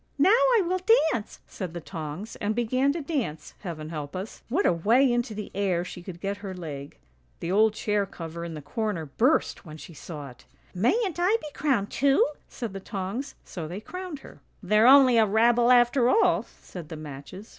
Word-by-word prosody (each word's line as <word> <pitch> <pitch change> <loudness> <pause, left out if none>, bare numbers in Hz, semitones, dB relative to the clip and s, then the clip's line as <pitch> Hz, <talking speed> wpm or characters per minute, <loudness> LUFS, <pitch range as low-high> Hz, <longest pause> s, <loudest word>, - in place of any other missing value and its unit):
" - - -41
' - - -40
Now 315 +8 +5
I - - +4
will 370 +2 0 0.3
dance,' 230 -4 -5
said 180 -4 -7
the - - -3
tongs, 165 +5 -7
and 210 +1 -1
began 255 +4 +1
to 335 - -4
dance; 255 - -3
heaven 155 -5 -6
help 150 -2 -6
us, 190 +4 -6
what 345 +12 +1
a - - +4
way 235 +10 +3
into 240 -3 -1
the 210 0 -6
air 185 -3 0
she 180 - -8
could 175 -1 -9
get 200 +2 -3
her 200 -2 -7
leg. 145 -5 -7 0.4
The 170 - -3
old 215 +2 +4
chair 205 -2 0
cover 170 -1 -7
in 170 -1 -6
the 150 - -8
corner 180 +2 -3
burst 240 - +1
when 155 -4 -10
she 165 - -11
saw 145 -3 -8
it! 125 - -19 0.2
' - - -33
Mayn't 345 - +1
I 380 +6 +3
be 300 - -8
crowned 255 -9 0
too,' 275 +1 +3 0.2
said 230 -6 -6
the 195 - -5
tongs, 195 +7 -5
so 165 -4 -6
they 180 +5 -6
crowned 360 - -7
her. - - -14
" - - -40
' - - -33
They're 215 +2 +4
only 260 -3 +7
a 220 - +4
rabble 235 +3 +4
after 245 0 +5
all,' 440 - +3
said 170 -4 -9
the 160 - -6
matches. 155 +8 -9
210 Hz, 215 wpm, -26 LUFS, 170-255 Hz, 0.4 s, only